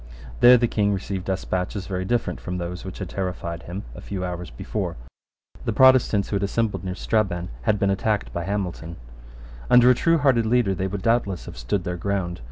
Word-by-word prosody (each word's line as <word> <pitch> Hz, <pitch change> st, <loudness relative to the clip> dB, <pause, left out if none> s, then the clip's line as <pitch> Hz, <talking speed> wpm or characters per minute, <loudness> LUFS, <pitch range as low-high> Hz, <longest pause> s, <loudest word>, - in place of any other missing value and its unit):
There 125 Hz, +1 st, +8 dB
the 120 Hz, 0 st, +2 dB
King 105 Hz, -2 st, +1 dB
received 95 Hz, -1 st, -4 dB
despatches 95 Hz, +1 st, -2 dB
very 95 Hz, -1 st, -3 dB
different 120 Hz, +3 st, -1 dB
from 90 Hz, -1 st, -4 dB
those 90 Hz, 0 st, -5 dB
which 95 Hz, -, -7 dB
had 95 Hz, -, -5 dB
terrified 85 Hz, -2 st, -4 dB
him 90 Hz, +4 st, -6 dB
a -, -, -10 dB
few 95 Hz, -2 st, -4 dB
hours 90 Hz, 0 st, -5 dB
before. -, -, -4 dB, 0.7 s
The 115 Hz, -, 0 dB
Protestants 130 Hz, -5 st, +5 dB
who 100 Hz, -, 0 dB
had -, -, -2 dB
assembled 100 Hz, -1 st, -1 dB
near 90 Hz, -1 st, -4 dB
Strabane 95 Hz, -5 st, -1 dB, 0.2 s
had 105 Hz, -, +4 dB
been 100 Hz, -1 st, +1 dB
attacked 105 Hz, +2 st, -1 dB
by 85 Hz, -1 st, -3 dB
Hamilton. 90 Hz, -4 st, -3 dB, 0.7 s
Under 125 Hz, +1 st, +7 dB
a -, -, +6 dB
truehearted 135 Hz, -6 st, +3 dB
leader 115 Hz, -4 st, +2 dB
they 95 Hz, +1 st, -2 dB
would 95 Hz, 0 st, -5 dB
doubtless 115 Hz, -6 st, +1 dB
have -, -, -9 dB
stood 75 Hz, +11 st, -2 dB
their 90 Hz, -1 st, -3 dB
ground. 95 Hz, -2 st, -2 dB
100 Hz, 190 wpm, -24 LUFS, 90-110 Hz, 0.7 s, There